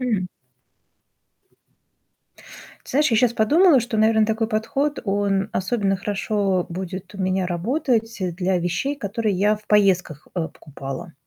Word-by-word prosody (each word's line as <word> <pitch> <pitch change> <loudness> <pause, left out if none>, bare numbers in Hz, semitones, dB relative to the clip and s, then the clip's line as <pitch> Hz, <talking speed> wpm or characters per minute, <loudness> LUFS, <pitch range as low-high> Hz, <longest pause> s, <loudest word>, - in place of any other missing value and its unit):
М. 215 -8 -1 2.6
Ты - - -10
знаешь, 295 0 +2
я - - +4
сейчас 240 0 +3
подумала, 295 - +5
что, 235 -1 -2
наверно, 220 0 +4
такой 220 0 0
подход, 270 +7 -1
он 200 0 0
особенно 195 0 0
хорошо 200 -2 -1
будет 185 +2 -6
у 200 - -9
меня 185 -1 0
работать, 225 - -1
э, 180 -2 -1
для 180 +1 0
вещей, 180 +12 -2
которые 210 -3 -2
я 205 +3 +3
в 210 - -12
поездках, 185 -7 +2
э, 165 -2 -1
покупала. 140 +2 -8
205 Hz, 140 wpm, -22 LUFS, 185-225 Hz, 2.6 s, подумала